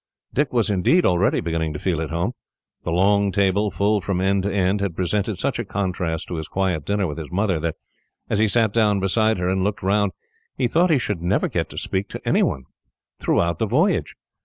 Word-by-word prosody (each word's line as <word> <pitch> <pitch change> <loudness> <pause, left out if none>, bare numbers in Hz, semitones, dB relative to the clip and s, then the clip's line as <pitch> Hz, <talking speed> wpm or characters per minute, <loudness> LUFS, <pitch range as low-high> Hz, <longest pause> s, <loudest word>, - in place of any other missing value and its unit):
Dick 145 0 +1
was, 115 -5 +2
indeed, 105 - +3
already 90 +3 +2
beginning 80 -2 -2
to - - -4
feel 85 -4 -1
at 80 - -3
home. 85 +6 -1 0.5
The - - -4
long 100 +3 +3
table, 100 +2 +2
full 105 +1 +1
from 95 -1 -1
end 95 +1 +2
to 100 +2 -2
end, 95 +1 +1
had 100 -4 -2
presented 100 +2 -1
such - - -1
a - - -1
contrast 90 -4 -2
to 85 - -3
his 80 - -5
quiet 95 -6 -1
dinner 100 -1 0
with 75 -1 -4
his 80 0 -8
mother, 95 -2 +1
that, 80 0 -2 0.5
as 105 - 0
he 110 - +4
sat 110 0 +2
down 105 -3 +3
beside 110 +3 +2
her 90 0 -1
and 95 0 +1
looked 105 0 -2
round, 100 0 +2 0.4
he 130 - +2
thought 170 +8 +3
he 155 - +4
should 105 -8 -2
never 90 +3 +1
get - - -2
to - - -11
speak 95 +1 -2
to - - -8
anyone 65 - +1 0.6
throughout 85 -1 +1
the - - +1
voyage. - - +1
95 Hz, 215 wpm, -22 LUFS, 90-105 Hz, 0.6 s, he